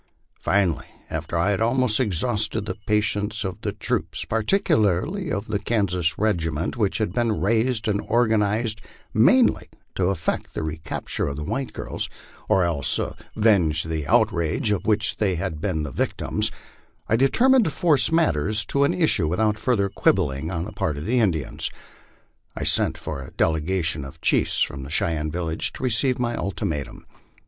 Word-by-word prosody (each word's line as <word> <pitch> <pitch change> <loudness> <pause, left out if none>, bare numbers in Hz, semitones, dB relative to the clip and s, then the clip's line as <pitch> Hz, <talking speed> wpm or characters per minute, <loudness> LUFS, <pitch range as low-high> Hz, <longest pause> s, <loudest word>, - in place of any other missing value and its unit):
Finally, 95 -6 +1 0.2
after 85 - -3
I 90 +5 +2
had 100 - -1
almost 120 0 +2
exhausted 105 -1 0
the 100 - -3
patience 105 0 0
of 95 -2 -5
the - - -2
troops, - - -3
particularly 115 - +1
of 100 +2 -2
the 105 -1 -1
Kansas 90 -7 0
regiment 85 - -1
which 105 -5 0
had 105 -5 -1
been 115 -5 0
raised 115 +4 +1
and 105 -1 +1
organized 110 -1 +2 0.3
mainly 235 - +4 0.2
to 90 - 0
effect 95 - -2
the - - -2
recapture 80 +1 -4
of 70 - -4
thewhite 120 - -3
girls, - - -4 0.4
or 95 - +4
else 80 -6 +1 0.4
avenge 90 -8 +3
the 80 -3 -3
outrage 85 +5 +2
of 105 -1 -1
which 110 0 +1
they 95 -4 +1
had 80 -3 -4
been 80 -5 -1
the 70 - -5
victims, - - +2 0.6
I 115 - +2
determined 235 - +4
to - - +1
force 150 -3 +2
matters 105 - +3
to 140 - +3
an - - 0
issue 155 - +3
without 105 +5 +1
further 110 -4 +1
quibbling 80 -6 0
on 85 -1 -3
the - - -8
part 75 - -2
of 75 - -5
the 125 +3 +2
Indians. 85 - -1 0.9
I - - -4
sent - - +2
for - - -5
a - - -9
delegation 80 -1 0
of 70 +4 -10
chiefs - - +1
from 70 - -4
the 65 - -8
Cheyenne 80 0 0
village 80 0 -2
to - - -7
receive 125 +1 +2
my 120 -1 -1
ultimatum. 80 -9 -4
100 Hz, 160 wpm, -23 LUFS, 80-115 Hz, 0.9 s, mainly